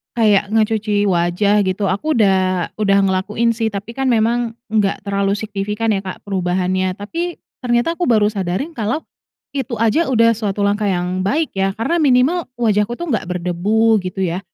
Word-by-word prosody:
kayak 210 -4 +3
ngecuci 215 -1 +1
wajah, 180 +4 +2
gitu. 190 +1 0
Aku 305 +12 -1
udah 190 -5 +2
udah 200 -2 +3
ngelakuin 195 +5 +1
sih, 225 0 -1
tapi 205 +1 -5
kan 270 +2 -2
memang 230 0 +1 0.2
enggak 205 -3 0
terlalu 200 0 0
signifikan 210 +1 -2
ya 195 - +1
Kak 190 -2 -8
perubahannya. 185 -1 -1
Tapi, 335 - -4 0.2
ternyata 245 +7 0
aku 355 - 0
baru 215 -4 +4
sadari 195 - -2
kalau 240 +1 -2 0.5
itu 265 -3 -3
aja 230 +9 +2
udah 230 -2 +5
suatu 205 -2 -3
langkah 205 +1 +1
yang 180 0 -1
baik 300 +11 0
ya, 195 0 +1
karena 230 +10 -1
minimal 285 +5 +3
wajahku 215 0 +1
tuh 345 +6 -6
enggak 220 - 0
berdebu 190 +5 +1
gitu 185 +1 -5
ya, 175 0 -1
210 Hz, 165 wpm, -18 LUFS, 195-230 Hz, 0.5 s, udah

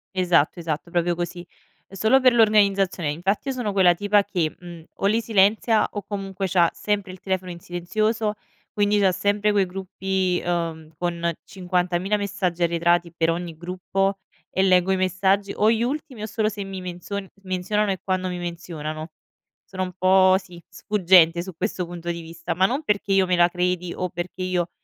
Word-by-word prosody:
Esatto, 175 -3 +2
esatto, 160 0 -4
proprio 175 0 +1
così, 175 +1 -5 0.4
è 195 - -14
solo 220 +7 +4
per 255 -2 +5
l'organizzazione. 200 -7 +3
Infatti 195 - -1
io - - -1
sono 245 -5 -2
quella 190 -3 +5
tipa 205 +2 +2
che, 175 -6 -2
mhmm, 175 -2 -11
o - - -3
li 215 +3 +3
silenzia 215 +1 +3
o 205 - -5
comunque 195 -1 -4
c'ha 175 -2 +3
sempre 205 -2 -2
il 185 - -11
telefono 185 -1 -3
in 170 - -9
silenzioso, 210 +6 -1 0.4
quindi 205 0 +2
c'ha 190 -2 +4
sempre 205 +3 +1
quei 200 -2 +2
gruppi, 190 0 -2
ehm, 165 -2 -3
con 170 0 -1
50000 180 +1 -1
messaggi 195 -4 -2
arretrati 170 0 +2
per 165 -1 +1
ogni 170 -1 -4
gruppo 185 +3 -2 0.3
e 190 - +1
leggo 185 0 +4
i - - +3
messaggi 190 +2 +1
o 215 - +3
gli 225 0 +2
ultimi 260 -3 -4
o - - -1
solo 215 0 0
se 205 -1 -6
mi 195 -1 -7
menzion 180 +3 -5
s 195 - -29
menzionano 195 +3 0
e 190 - -3
quando 185 -1 -1
mi 180 - -4
menzionano. 165 -2 -6 0.6
Sono 185 -1 -3
un 185 - -4
po', 185 0 +5
sì, 180 -3 -14
sfuggente 175 -4 +3
su 190 - -7
questo 185 0 -2
punto 175 0 -7
di 170 - -5
vista, 165 0 -5
ma 185 +2 +4
non 265 +9 -1
perché 200 -6 -1
io 195 -1 +4
me 180 - +2
la 175 0 +5
credi 180 0 -1
o 180 - -2
perché 175 +2 -6
io 180 -2 -1
185 Hz, 185 wpm, -23 LUFS, 175-200 Hz, 0.6 s, per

